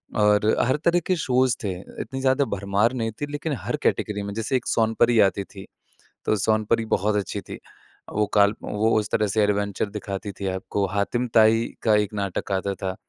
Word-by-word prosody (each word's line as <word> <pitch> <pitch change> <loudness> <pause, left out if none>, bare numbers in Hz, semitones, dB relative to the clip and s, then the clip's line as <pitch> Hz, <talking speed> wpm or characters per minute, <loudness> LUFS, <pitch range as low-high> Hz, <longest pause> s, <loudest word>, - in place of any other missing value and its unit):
और 105 -1 +3 0.2
हर 130 - +2
तरह 175 +1 +4
के 185 - +1
शोज़ 130 -4 +2
थे, 100 - -1 0.3
इतनी 135 - -5
ज़्यादा 135 +1 +2
भरमार 100 +3 0
नहीं 115 -3 -2
थी - - 0
लेकिन 145 +1 -3
हर - - -3
कैटेगरी 105 -1 0
में 100 0 -5
जैसे 115 +4 -2
एक 125 - -1
सोनपरी 115 +1 +2
आती 100 +1 -3
थी 95 0 -12 0.6
तो - - +2
सोनपरी 110 +2 +1
बहुत 105 0 0
अच्छी 100 -2 -2
थी। - - -9 0.5
वो 105 0 +2
काल्प 105 0 +4
वो 110 +2 0
उस 105 - -4
तरह 105 -1 +2
से 105 +2 +1
एडवेंचर 100 0 0
दिखाती 100 -1 -5
थी 100 - -3
आपको। 95 +1 -2
हातिम 100 +6 -1
ताई 115 0 +5 0.2
का 110 -2 +4
एक 105 0 0
नाटक 100 -1 -3
आता 100 +1 0
था। 95 -1 -4
105 Hz, 195 wpm, -24 LUFS, 100-115 Hz, 0.6 s, ताई